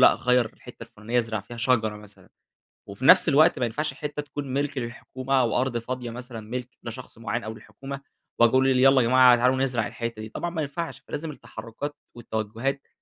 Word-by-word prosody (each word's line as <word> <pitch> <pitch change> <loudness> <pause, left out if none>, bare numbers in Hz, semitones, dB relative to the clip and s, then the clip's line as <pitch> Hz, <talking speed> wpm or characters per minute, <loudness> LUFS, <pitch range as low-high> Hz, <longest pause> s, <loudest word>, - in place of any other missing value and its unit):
لأ - - +2
غيّر 125 -1 +2
الحتّة 125 -1 -13
الفلانية، 115 +1 -3
ازرع 115 -3 -1
فيها 120 +4 -11
شجرة 115 -3 +1
مثلًا، 105 -1 -14 0.6
وفي 100 +7 -6
نَفس 180 -1 +8
الوقت 155 +4 +5
ما 125 - +2
ينفعش 145 +5 -2
حتّة 150 +1 -4
تكون 145 -2 -6
مِلك 140 0 -1
للحكومة، 130 +2 -5
أو 120 0 +1
أرض 130 -2 -1
فاضية 125 +1 -4
مثلًا 120 0 -7
ملك 125 0 -5
لشخص 120 +1 -8
معيّن 115 +1 -3
أو 110 - -5
للحكومة، 135 +4 -9 0.4
وأجي 120 -1 +6
أقول 130 0 +4
ل 130 - +3
ل - - +2
يالّا 135 0 +6
جماعة 125 +1 +7
تعالوا 125 +2 +3
نزرع 125 -4 0
الحتّة 115 -2 -5
دي، 110 - -7
طبعًا 175 - -3
ما 165 -2 -3
ينفعش، 150 +4 -4
فلازم 155 +1 -5
التحركات 120 +3 -7 0.2
والتوجهات 115 +4 -3
125 Hz, 195 wpm, -25 LUFS, 115-135 Hz, 0.6 s, نَفس